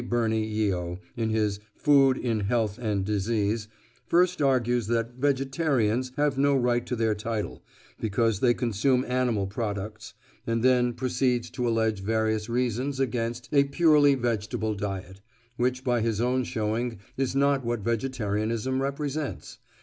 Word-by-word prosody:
Burney 110 -2 +1
Yeo, 95 -5 -1 0.2
in 115 -2 -1
his 105 -2 0 0.2
"Food 135 -3 +4
in 115 -3 -1
Health 105 +1 0
and 105 -5 -1
Disease," 105 +1 0 0.4
first 180 -1 +3
argues 125 -4 +2
that 115 +1 -1
"vegetarians" 130 -3 0
have 145 -2 +1
no 140 0 +4
right 120 -2 +2
to 125 - -1
their 110 -2 +1
title, 105 0 -4 0.4
because 110 -1 +1
they 120 0 +3
consume 125 +2 +1
animal 125 -5 0
products, 105 +1 -5 0.3
and 115 0 0
then 125 -1 +3
proceeds 125 0 0
to 125 -2 -1
allege 110 -2 +1
various 110 +1 0
reasons 125 +3 -1
against 120 -2 -2
"a 140 -1 +4
purely 145 -1 +4
vegetable 110 -3 -1
diet," 95 -2 -5 0.3
which 125 +2 0
by 120 -3 +1
his 110 -2 0
own 125 +1 +1
showing 115 +2 -2 0.2
is 135 -1 -1
not 140 -1 +2
what 120 -1 -2
vegetarianism 115 +1 -1
represents. 140 +1 -4
120 Hz, 140 wpm, -27 LUFS, 110-130 Hz, 0.4 s, Food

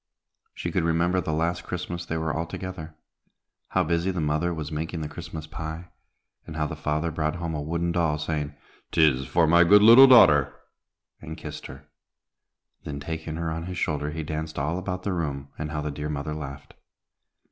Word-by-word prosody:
She - - -4
could - - 0
remember 85 +3 +2
the 80 - -3
last 85 +2 -1
Christmas 85 -1 -5
they 80 - -2
were 80 -1 -1
all 80 +1 -2
together. 80 -3 -7 0.7
How - - +1
busy 85 +2 0
the 90 -2 -2
mother 75 +3 0
was 80 -2 -5
making 80 +2 -3
the 75 - -3
Christmas 80 +1 -7
pie, 80 +2 -7 0.6
and 80 - -7
how 80 -1 0
the 80 - -4
father 75 +2 -1
brought 75 +1 -1
home 85 -2 -4
a 75 - -3
wooden 85 +3 -1
doll, 85 -3 +1
saying, 75 -1 -3 0.3
"'Tis 65 -4 +3
for 85 -1 +3
my 85 +2 +6
good 105 +4 +6
little 120 +5 +10
daughter," 80 - +6 0.7
and 80 0 -7
kissed - - -8
her. - - -12 1.0
Then, 70 -1 -5
taking 80 +1 -5
her 80 0 -2
on 80 +1 -4
his 90 0 -6
shoulder, 75 -3 -1
he 80 +1 -4
danced 80 0 -5
all 75 +6 -1
about 90 -1 -4
the 100 - -1
room, 70 -5 -3
and 75 0 -3
how 75 -1 -3
the 75 0 -3
dear 75 +2 -5
mother 75 +1 -3
laughed. 70 -2 -8
80 Hz, 190 wpm, -26 LUFS, 75-85 Hz, 1.0 s, little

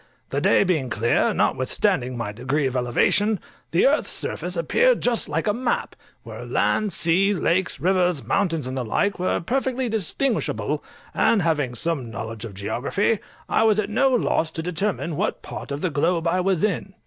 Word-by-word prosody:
The - - -1
day - - +4
being 160 -9 0
clear, 115 +1 +1
notwithstanding 130 - 0
my 115 -3 -3
degree 130 +7 -1
of 130 -1 -1
elevation, 185 - +2 0.3
the - - +3
earth's - - +2
surface - - -3
appeared - - +3
just 240 -8 +1
like 160 +2 -1
a 210 - +2
map, 460 - -2 0.3
where - - -8
land, 215 -2 0
sea, 190 +5 +2
lakes, 175 -2 0
rivers, 180 -3 +1
mountains, 165 - 0
and 130 +1 -4
the 130 - -2
like 200 - 0
were 185 - 0
perfectly 260 +4 -1
distinguishable; 225 - -1 0.3
and 210 -6 +3
having 145 -7 0
some 145 -4 -2
knowledge 110 0 -6
of 105 -4 -9
geography, 140 - -1 0.3
I - - +2
was 220 -1 +4
at 210 0 -2
no 265 +5 +3
loss 230 -9 +1
to 160 - -4
determine 175 -2 -2
what - - -2
part - - -7
of 140 +1 -3
the - - -1
globe 165 +3 +1
I 180 +2 +1
was 185 -2 +1
in. 195 -1 -1
175 Hz, 175 wpm, -23 LUFS, 135-210 Hz, 0.3 s, day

